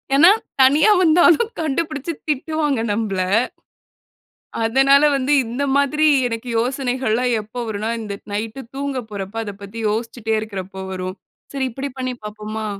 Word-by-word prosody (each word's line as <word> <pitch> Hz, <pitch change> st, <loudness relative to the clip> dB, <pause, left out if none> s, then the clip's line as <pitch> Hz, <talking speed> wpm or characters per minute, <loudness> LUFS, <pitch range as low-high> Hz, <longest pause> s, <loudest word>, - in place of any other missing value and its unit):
ஏன்னா, 325 Hz, +6 st, +8 dB, 0.3 s
தனியா 290 Hz, +9 st, +6 dB
வந்தாலும் 350 Hz, +6 st, +5 dB
கண்டுபிடிச்சு, 310 Hz, 0 st, -2 dB, 0.2 s
திட்டுவாங்க 295 Hz, -2 st, 0 dB
நம்பள. 205 Hz, -3 st, -1 dB, 1.4 s
அதனால 270 Hz, +5 st, +5 dB
வந்து 270 Hz, +1 st, 0 dB
இந்த 240 Hz, +5 st, -4 dB
மாதிரி 300 Hz, +2 st, +2 dB, 0.2 s
எனக்கு 230 Hz, +1 st, -5 dB
யோசனைகள்லாம் 250 Hz, -1 st, 0 dB
எப்ப 215 Hz, +3 st, -21 dB
வரும்ன்னா, 215 Hz, 0 st, -3 dB
இந்த 210 Hz, -2 st, -5 dB, 0.2 s
நைட்டு 220 Hz, +5 st, -4 dB
தூங்க 275 Hz, -1 st, -2 dB
போரப்ப, 200 Hz, +1 st, -6 dB
அத 205 Hz, -2 st, -6 dB
பத்தி 200 Hz, +3 st, -7 dB
யோசிச்சுட்டே 225 Hz, 0 st, -2 dB
இருக்கிறப்ப 190 Hz, -3 st, -6 dB
வரும். 185 Hz, 0 st, -5 dB, 0.4 s
"சரி 270 Hz, -1 st, 0 dB
இப்படி 275 Hz, +3 st, -4 dB
பண்ணி 255 Hz, -1 st, -2 dB
பாப்போமா?" 215 Hz, +1 st, -5 dB
245 Hz, 125 wpm, -20 LUFS, 215-280 Hz, 1.4 s, ஏன்னா